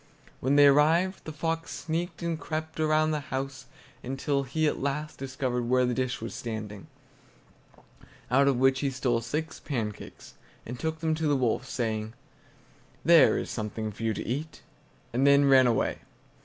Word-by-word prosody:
When 135 +3 +1
they 145 0 +7
arrived, 160 +7 +3
the 155 - -5
fox 165 +2 -3
sneaked 170 +2 -4
and 165 -2 -2
crept 160 +1 -5
around 155 -1 +1
round 155 0 +3
the 150 - 0
house, 135 -1 -5 0.3
until 135 +2 -1
he 155 +4 -1
at 150 - 0
last 150 +3 -3
discovered 130 -3 -2
where 125 0 +3
the 125 - 0
dish 130 0 -2
was 115 - -5
standing, 110 -3 -6 1.4
out 140 +2 +4
of 135 -3 +3
which 130 +1 +3
he 140 - 0
stole 125 -3 0
six 150 +8 -4
pancakes, 110 -7 -6 0.3
and 120 +2 -7
took 160 0 -3
them 160 -1 +1
to 155 0 -1
the 145 - +3
wolf, 130 +1 -1
saying, 110 -2 -2 0.9
"There 165 -4 +6
is - - -4
something 110 0 -4
for 105 - -12
you 110 -1 0
to - - -5
eat!" 150 +6 -4 0.5
and 130 +4 +3
then 140 0 +6
ran 135 -2 +6
away. 115 - 0
135 Hz, 170 wpm, -28 LUFS, 120-155 Hz, 1.4 s, they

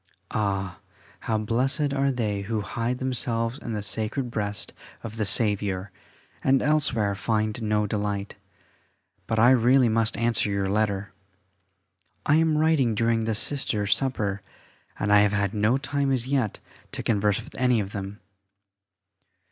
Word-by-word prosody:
[A] - - -11
Ah! 95 -3 -1 0.4
how 110 - -1
blessed 130 +7 0
are 140 0 +2
they 105 -6 -1
who 105 +1 -2
hide 115 +5 -2
themselves 120 -1 -2
in 115 - -5
the 105 -2 -3
sacred 115 +5 -2
breast 105 -2 -3 0.3
of 110 -2 -6
the 110 -2 -1
Saviour, 100 -3 0 0.5
and 135 0 +3
elsewhere 135 -9 +2
find 110 +3 -1
no 105 -1 +1
delight. 105 -1 -2 0.9
But 110 - -1
I 120 +3 +6
really 125 0 +5
must 115 0 +1
answer 115 -3 +1
your 100 -1 0
letter. 100 -1 -1 1.1
I 150 - +4
am 160 -1 +3
writing 150 -7 +3
during 115 0 +1
the 110 -1 0
Sisters' 105 -5 0
supper, 105 -7 -2 0.6
and 105 0 +1
I 105 - +8
have 105 0 +3
had 100 -1 0
no 105 +4 +2
time 140 0 -1
as 125 -3 0
yet 130 -6 0 0.3
to - - -4
converse 105 -2 +1
with - - -11
any 125 -2 +2
of 100 -2 -3
them. 100 0 -6
110 Hz, 150 wpm, -25 LUFS, 105-125 Hz, 1.1 s, I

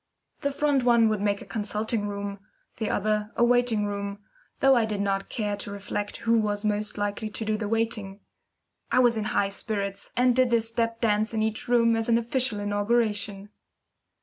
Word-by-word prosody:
The 280 - 0
front 280 -1 +1
one 235 -2 +5
would 215 -2 -1
make 200 -1 0
a - - -14
consulting 215 0 -2
room, 200 0 -5 0.4
the 220 - -2
other 210 +1 0
a - - +3
waiting 240 -3 +3
room, 200 0 -4 0.4
though 270 -1 +5
I 235 - +3
did 215 -2 -2
not 195 -1 -1
care 210 -2 -2
to 205 - -5
reflect 205 +1 -4
who 230 0 +4
was 210 -1 -1
most 210 0 -1
likely 205 +1 -2
to 220 +1 -4
do 215 0 +1
the 215 -1 -3
waiting. 215 -3 -2 0.7
I - - +2
was 245 -2 +5
in 220 - -1
the 215 - -2
highest 200 0 0
spirits, 200 -3 -3
and 250 0 +4
did 255 -1 +3
a 230 - +3
step 230 0 -1
dance 215 0 +1
in 215 - +1
each 220 0 -2
room 230 -1 +4
as 225 +1 -1
an 230 - +5
official 235 -1 0
inauguration. 205 -1 0
215 Hz, 195 wpm, -26 LUFS, 205-230 Hz, 0.7 s, one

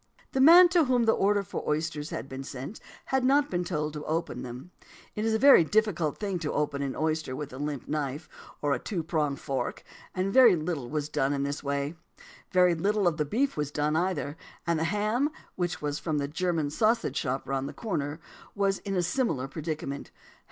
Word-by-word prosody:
"The 265 - +1
man 345 +5 +9
to 340 -2 +4
whom 250 -2 +2
the 225 - +4
order 205 -1 +2
for - - -5
the - - -5
oysters 150 0 -2
had - - -5
been 135 0 -6
sent 135 - -7 0.3
had 265 -1 +3
not 280 +3 +3
been 175 0 0
told 155 -4 -2
to 150 -1 -6
open 160 -6 -2
them; 125 +7 -8 0.4
it 210 - -3
is 225 0 +2
a - - +3
very 270 -6 +8
difficult 175 -5 +1
thing 195 -4 -2
to 155 -2 -2
open 145 -1 -1
an 135 -2 -2
oyster 155 -4 -1
with 145 -1 -6
a 130 - -8
limp 145 -3 -4
knife 145 0 -3 0.4
or 145 -1 +2
a 125 - -1
two 175 - -3
pronged 150 -4 -1
fork; 135 -1 -3 0.3
and 190 +2 -1
very 245 -6 +8
little 155 -6 -3
was 150 -1 -2
done 140 -2 0
in 140 -1 -1
this 140 +1 -3
way. 140 +1 -1 0.6
Very 180 -1 +5
little 200 +4 +1
of 165 -3 +1
the 150 - 0
beef 260 - 0
was 150 -2 -2
done 150 +1 0
either; 160 -4 -1 0.3
and 170 -2 +1
the 160 - 0
ham 215 - +1 0.2
(which 175 -3 -3
was 145 0 -2
from 155 -3 -2
the 140 -1 -1
German 160 -1 -1
sausage 215 - +1
shop 130 -1 -2
round 135 0 -2
the - - -6
corner) 155 -8 -3 0.4
was 195 -1 +1
in 195 -1 -4
a 180 - +1
similar 175 - 0
predicament. 150 -1 -5
160 Hz, 210 wpm, -28 LUFS, 145-200 Hz, 0.6 s, man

